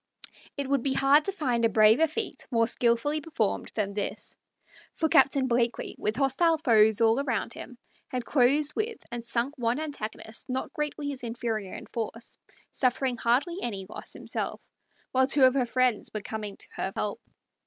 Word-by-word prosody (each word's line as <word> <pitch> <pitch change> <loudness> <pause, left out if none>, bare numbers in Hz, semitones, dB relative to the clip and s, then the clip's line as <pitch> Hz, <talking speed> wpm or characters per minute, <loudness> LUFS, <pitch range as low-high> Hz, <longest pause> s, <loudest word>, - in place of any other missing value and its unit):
It 280 -1 -2
would 275 -1 +1
be 270 +1 0
hard 275 +3 +4
to 395 - 0
find 255 -11 -1
a 230 - +5
braver 220 +8 +5
feat 435 +9 -5
more 230 -2 +3
skilfully 240 +6 +1
performed 260 -10 -2
than 200 -2 -1
this; 205 0 -5 0.6
for 320 - +1
Captain 275 -3 +4
Blakeley, 235 -1 0
with 210 +1 -1
hostile 285 +5 +2
foes 220 -7 +4
all 230 +4 +4
round 235 -3 -2
him, 250 - -10 0.3
had 250 -2 -4
closed 285 +3 +3
with 440 +1 -2
and 240 -1 -4
sunk 240 +4 -1
one 240 +3 0
antagonist 230 -6 -6
not 260 +6 -3
greatly 300 -2 -3
his 275 -2 -6
inferior 225 -4 -3
in - - -8
force, 230 0 -6 0.3
suffering 255 -1 0
hardly 255 +10 +1
any 200 -5 -4
loss - - -9
himself, - - -4 0.5
while 260 0 +3
two 275 0 +3
of 255 -1 +7
her 260 -3 +1
friends 255 -3 +1
were 215 - -4
coming 210 -1 -6
to - - -9
her 190 - -2
help. 205 -1 -3
245 Hz, 175 wpm, -28 LUFS, 225-280 Hz, 0.6 s, of